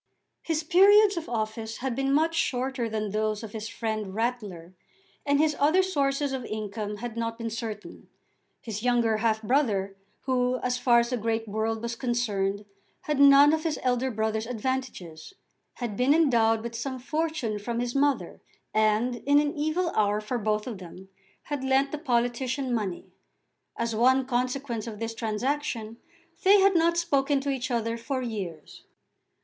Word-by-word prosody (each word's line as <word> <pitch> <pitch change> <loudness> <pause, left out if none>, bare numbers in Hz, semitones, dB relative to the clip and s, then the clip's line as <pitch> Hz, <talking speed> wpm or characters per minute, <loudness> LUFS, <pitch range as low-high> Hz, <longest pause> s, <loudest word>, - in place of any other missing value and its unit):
His 320 -1 -1
periods 395 +5 +6
of 335 -2 -5
office 220 -1 -3
had 260 -2 -3
been 270 +1 0
much 320 +4 +2
shorter 255 -6 -1
than 215 -2 -3
those 215 +1 -1
of 220 - -7
his 220 0 -5
friend 215 -4 -4
Rattler, 210 -7 -3 0.5
and 285 0 +3
his 305 -1 +2
other 315 +7 +4
sources 280 -5 0
of 260 -2 -3
income 210 -1 -4
had 235 +1 -6
not 230 0 -3
been 230 -1 -4
certain. 220 -2 -7 0.6
His 220 -4 -5
younger 235 -2 +2
half 220 0 0
brother, 210 -6 +1 0.3
who, 255 -1 0
as 250 0 0
far 240 -1 +5
as 235 +2 -4
the 250 - 0
great 225 0 -2
world 220 +2 -2
was 235 0 -3
concerned, 210 -5 -1 0.4
had 300 -2 -2
none 280 +1 +8
of 315 0 0
his 320 -2 -1
elder 250 0 +1
brother's 220 -1 -2
advantages, 250 - -4 0.4
had 235 -5 -5
been 255 +6 +3
endowed 230 -8 +3
with 235 0 -5
some 260 +3 -4
fortune 290 -5 -2
from 235 +3 -3
his 240 0 -2
mother, 280 0 0 0.3
and, 220 +3 +2
in 285 +4 +2
an 295 0 0
evil 315 +4 0
hour 210 0 +2
for 225 +3 -3
both 215 0 -1
of 230 -6 -6
them, 185 +1 -11 0.3
had 290 -3 -4
lent 265 +1 +2
the 305 - -4
politician 250 -1 -1
money. 205 -6 -3 0.7
As 230 -1 -2
one 260 +3 +4
consequence 250 -2 -2
of 220 -2 -6
this 225 +1 -4
transaction, 230 0 -3 0.4
they 400 +2 +6
had 390 -1 +4
not 335 0 +3
spoken 285 -4 +1
to 280 0 -1
each 260 -1 -3
other 230 -1 -1
for 255 +2 -3
years. 190 -10 -6
240 Hz, 165 wpm, -27 LUFS, 220-275 Hz, 0.7 s, none